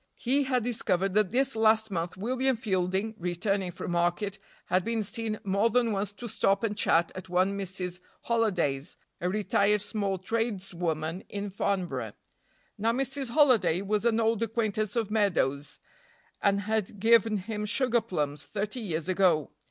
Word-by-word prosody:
He 275 +3 +1
had 255 -3 +1
discovered 195 -5 0
that 210 -2 +3
this 270 +2 +1
last 220 -1 +3
month 170 0 -3
William 255 +5 +1
Fielding, 190 0 -1
returning 185 +2 -1
from 175 - -6
market, 175 +4 0 0.3
had 185 +1 +1
been 230 0 -1
seen 220 +1 -3
more 200 +3 +2
than 235 0 +2
once 200 0 -1
to 235 +3 -7
stop 195 -1 +1
and 210 -2 0
chat 170 -3 +2
at 185 0 -8
one 185 +2 +2
Mrs. 185 -2 -3 0.2
Holiday's, 180 - 0 0.2
a 180 - -1
retired 210 +1 +2
small 200 -1 -1
tradeswoman 185 -5 -2
in 200 0 -4
Farnborough. 190 -2 -2 0.7
Now 225 +3 +2
Mrs. 270 +1 -2
Holiday 235 - +4
was 210 +1 0
an 230 -1 +2
old 225 -1 +1
acquaintance 215 -2 -1
of 225 -3 -1
Meadows' 165 -10 0 0.6
and 200 0 +2
had 215 -1 -2
given 225 0 +4
him 210 +2 -4
sugar 240 +1 +2
plums 150 -9 -2
thirty 210 +4 -4
years 170 -7 -2
ago. 180 -6 +2
205 Hz, 150 wpm, -28 LUFS, 185-225 Hz, 0.7 s, Holiday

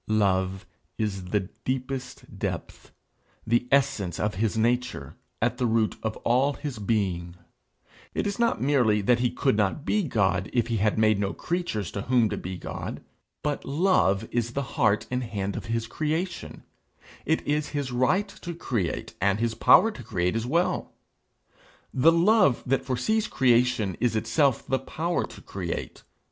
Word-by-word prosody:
Love 95 -2 +1 0.3
is 100 -4 -2
the 100 +3 0 0.2
deepest 130 0 -4
depth, - - -5 0.5
the 120 +2 +1
essence 130 - +1
of 105 0 0
his 110 +3 -1
nature, 120 +3 0 0.3
at 120 +1 0
the 125 - +2
root 110 -1 +1
of 110 -1 -3
all 130 +4 +3
his 140 -5 -6
being. 95 -5 -1 0.8
It - - 0
is 200 +1 -2
not 235 -1 +2
merely 125 -6 +3
that 120 +4 +3
he 125 0 +2
could 135 -1 +1
not 105 +7 0
be 210 - +2
God, 100 - 0
if 120 -1 +1
he 115 - 0
had 105 +1 +1
made 110 -2 +3
no 100 -1 -1
creatures 165 - -3
to 100 - -4
whom 120 -1 +2
to - - -3
be 90 0 -5
God; - - -6 0.4
but 150 -1 -1
love 135 - +2
is 120 0 -1
the 140 - -1
heart 110 -8 +2
and 125 0 -1
hand 100 -4 -3
of - - -5
his 115 0 -1
creation; 160 +8 -3 0.6
it 160 +2 0
is 150 +1 0
his 145 -3 -3
right 130 +12 +2
to 175 -3 -8
create, 115 - -2
and 100 +1 +2
his 115 -1 0
power 225 - +6
to - - -10
create 90 -1 -1
as 115 +1 -1
well. 170 +7 0 1.0
The 140 +6 +5
love 170 - +4
that 135 +1 +1
foresees 210 - 0
creation 120 -6 +2
is 120 -2 +1
itself 135 +3 +1
the 130 - 0
power 170 +2 -2
to - - -12
create. 90 -4 -5
120 Hz, 165 wpm, -26 LUFS, 105-140 Hz, 1.0 s, power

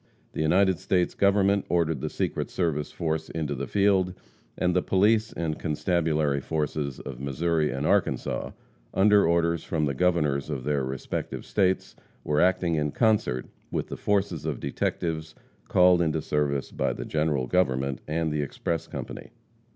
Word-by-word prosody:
The - - -3
United 90 +3 +3
States 95 -2 +1
Government 100 0 +3
ordered 80 -5 +1
the - - -2
Secret - - -2
Service 80 -5 -1
force 80 -2 -2
into 80 -3 -3
the 70 0 -4
field, 95 -2 +2 0.4
and 90 0 +1
the 90 - +4
police 105 +4 +2
and 80 -2 -3
constabulary 75 -3 0
forces 75 -2 -2
of - - -8
Missouri 75 +3 0
and 70 +2 -3
Arkansas, - - 0 0.5
under 100 -1 +5
orders 85 -1 +1
from 80 -2 -1
the 70 - 0
Governors 75 -3 +1
of 70 -4 -3
the 75 0 0
respective 65 +1 -4
states, 95 -2 0 0.3
were 75 0 +1
acting 90 -1 +2
in 75 -2 0
concert 105 - +1 0.2
with - - -3
the - - -4
forces 100 -6 0
of 75 -5 -3
detectives 80 -1 -2 0.3
called 90 -1 +5
into 80 -1 +1
service 75 -2 -1
by - - -1
the - - -6
General 75 -4 0
Government 70 -5 0
and 80 +1 -1
the 75 0 0
express 75 +3 -3
company. - - -7
80 Hz, 155 wpm, -26 LUFS, 75-90 Hz, 0.5 s, under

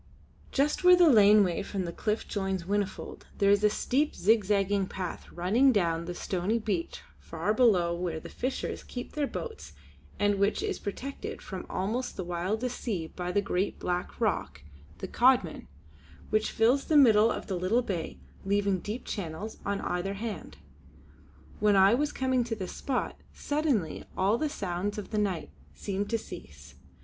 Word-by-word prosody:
Just 290 +5 +1
where 360 0 +9
the 355 -1 +6
laneway 205 -4 +5
from 195 -2 -3
the 170 - -4
cliff 210 +5 -2
joins 195 -3 -2
Whinnyfold 200 +2 -3
there 200 0 +4
is 205 0 +3
a 210 - +6
steep 275 +7 0
zigzag 200 -2 +2
path 185 -2 -6
running 215 +10 +3
down 170 -7 +1
to 170 - -7
the 175 - -4
stony 190 +6 -1
beach 200 -7 -3 0.2
far 170 +6 -2
below 195 -8 +4
where 170 -2 -3
the - - -10
fishers 260 +2 -4
keep 245 -1 -7
their 295 -2 -1
boats 445 - -7 0.4
and 205 -1 +2
which 200 +1 +1
is - - -2
protected 270 +7 -6
from 190 -2 -7
almost 225 +7 -2
the 185 - -2
wildest 195 +8 -2
seas 180 -9 -3
by 180 0 -3
the 205 +2 +1
great 195 -1 -1
black 180 0 -3
rock - - -1 0.3
the - - -5
Caudman, - - +2 0.6
which 215 0 +2
fills 245 +5 +2
the 310 - +3
middle 225 -5 +6
of - - -3
the 195 - -4
little 190 +8 +1
bay, 170 - -4 0.3
leaving 200 -1 +1
deep 210 +7 -5
channels 200 +2 -5
on 200 0 -1
either 180 +3 -2
hand. 220 +1 -6 1.0
When 210 -1 +4
I 195 +2 +6
was 295 +4 +1
come 260 -1 +1
to 230 -1 -3
this 190 -4 -6
spot, 265 -3 -3 0.2
suddenly 285 - -1
all 200 +5 +2
the 310 0 0
sounds 200 -5 -3
of 210 - -6
the 215 - 0
night 195 -5 -2 0.2
seemed 200 0 -3
to 230 - +1
cease. 75 - -11
205 Hz, 170 wpm, -29 LUFS, 185-230 Hz, 1.0 s, where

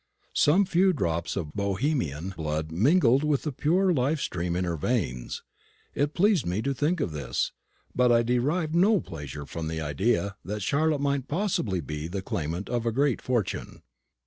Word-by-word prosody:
Some 180 +7 +4
few 185 +2 +3
drops 85 - -1
of 80 -7 -4
Bohemian 100 - -1
blood 80 -2 -3
mingled 130 - +4
with 150 -2 +1
the 150 - -2
pure 180 +7 +2
life 145 +2 +1
stream 85 -7 -2
in 90 - 0
her 85 -2 -1
veins. 75 - -2 0.5
It 145 +1 -1
pleased 200 -3 +3
me 90 +5 -2
to 140 - 0
think 155 +6 0
of 90 - -1
this; 70 -5 -2 0.4
but 125 -1 +3
I 120 0 +5
derived 145 +8 0
no 195 +5 +4
pleasure 75 - -7
from 80 +2 -5
the 80 0 -3
idea 95 +7 0
that 105 0 -4
Charlotte 150 +5 +1
might 140 -2 0
possibly 145 - 0
be 75 +1 -5
the 95 +2 -4
claimant 85 +4 -3
of 120 -1 -1
a - - +2
great 135 +1 +1
fortune. 120 -6 -2
115 Hz, 175 wpm, -27 LUFS, -, 0.5 s, I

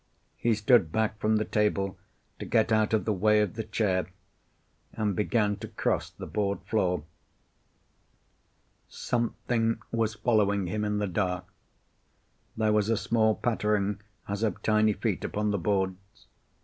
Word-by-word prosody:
He 115 -1 +2
stood 105 -5 +4
back 110 +1 0
from 110 +1 +2
the 110 0 +1
table, 100 -2 0 0.4
to - - -5
get 110 0 +2
out 110 -1 +3
of 110 -1 +1
the 110 - +1
way 105 +2 +3
of 105 -4 0
the 110 - -4
chair, 105 -4 0 0.9
and 105 -3 -1
began 105 0 +1
to - - -7
cross - - -1
the - - -9
board 100 -1 -2
floor. 90 -7 0 1.9
Something 115 -1 -1
was 110 -2 0
following 105 -3 +2
him 105 +4 -2
in 105 0 0
the 105 - 0
dark. 90 -1 -1 1.1
There 110 -1 +2
was 105 0 +2
a 115 - +2
small 110 -1 +2
pattering, 105 -3 0 0.3
as 100 +1 -3
of 110 -5 -1
tiny 110 0 +3
feet - - -2
upon 105 0 -1
the 100 - 0
boards. 95 +1 -2
105 Hz, 150 wpm, -28 LUFS, 100-110 Hz, 1.9 s, stood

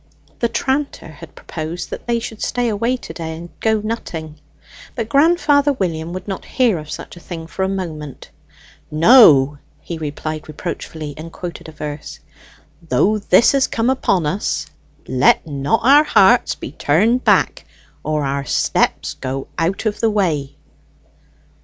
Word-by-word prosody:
The 235 - +1
tranter 275 +4 -2
had - - -13
proposed 165 +2 -6
that - - -7
they 235 0 +1
should 225 -2 -6
stay 245 -1 0
away 230 +4 0
to - - -9
day 160 -1 -5
and 170 +1 -9
go 220 -1 +1
nutting, 160 -9 -5 0.6
but 230 -3 -3
grandfather 290 +1 +3
William 170 -8 -3
would 185 +2 -7
not 195 -2 -4
hear 235 -9 +1
of 150 0 -10
such - - -7
a - - -11
thing 170 -2 -7
for 170 +3 -7
a 190 - +1
moment. 155 -8 -6 0.6
"No," 150 - +6 0.2
he 170 -2 -7
replied 155 0 -5
reproachfully, 155 0 -6
and 165 +2 -8
quoted 170 -1 -7
a - - -10
verse: 150 -1 -7 0.7
"Though 215 +2 +2
this 200 +2 +4
has 275 -1 +2
come 230 +3 +1
upon 195 -10 +1
us, 185 +8 -1 0.4
let 130 +5 +3
not 140 -2 0
our 280 +5 +7
hearts - - +4
be - - -8
turned 220 +12 +2
back, - - +2 0.4
or 150 -1 -1
our 140 0 -1
steps - - 0
go 135 +1 -5
out 175 +7 -1
of 210 -1 -1
the 225 - +2
way." 160 -10 -1
175 Hz, 155 wpm, -19 LUFS, 155-230 Hz, 0.7 s, our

